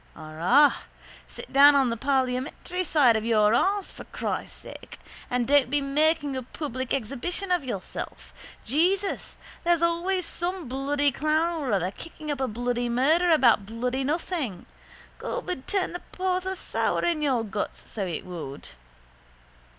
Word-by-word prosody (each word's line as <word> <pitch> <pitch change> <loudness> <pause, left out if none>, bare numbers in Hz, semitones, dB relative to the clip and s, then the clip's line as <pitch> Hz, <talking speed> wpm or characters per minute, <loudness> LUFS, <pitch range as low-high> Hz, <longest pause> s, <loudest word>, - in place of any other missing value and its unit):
Arrah, 170 - +3 0.5
sit - - -10
down 285 +1 +8
on 265 -4 +3
the - - -1
parliamentary 265 +7 -1
side 290 -8 +4
of 220 - 0
your 215 -2 +3
arse 390 +10 +1
for - - -10
Christ' - - -4
sake - - -11 0.3
and 245 -1 0
don't 285 -3 +4
be 290 +2 +2
making 290 +1 +1
a 260 - -2
public 260 0 -5
exhibition 280 - -2
of 355 -4 +2
yourself. 205 -8 -6 0.3
Jesus, 365 - 0 0.3
there's 340 -1 +2
always 345 +2 +1
some 350 -2 -3
bloody 280 +3 +1
clown 315 +4 0
or 265 -4 -2
other 190 -2 +1
kicking 310 +3 -8
up 280 -2 -3
a 265 - +1
bloody 245 +1 -2
murder 305 +9 +3
about 235 -10 +4
bloody 250 +4 -2
nothing. 295 - -2 0.5
Gob, - - -4
it'd 265 -8 -6
turn 390 -4 0
the 355 - -4
porter 370 0 -1
sour - - -1
in 340 -3 +1
your 260 -6 +1
guts, 205 -1 -5
so 210 - -4
it 170 - -4
would. 165 -6 -7
280 Hz, 150 wpm, -26 LUFS, 240-335 Hz, 0.5 s, down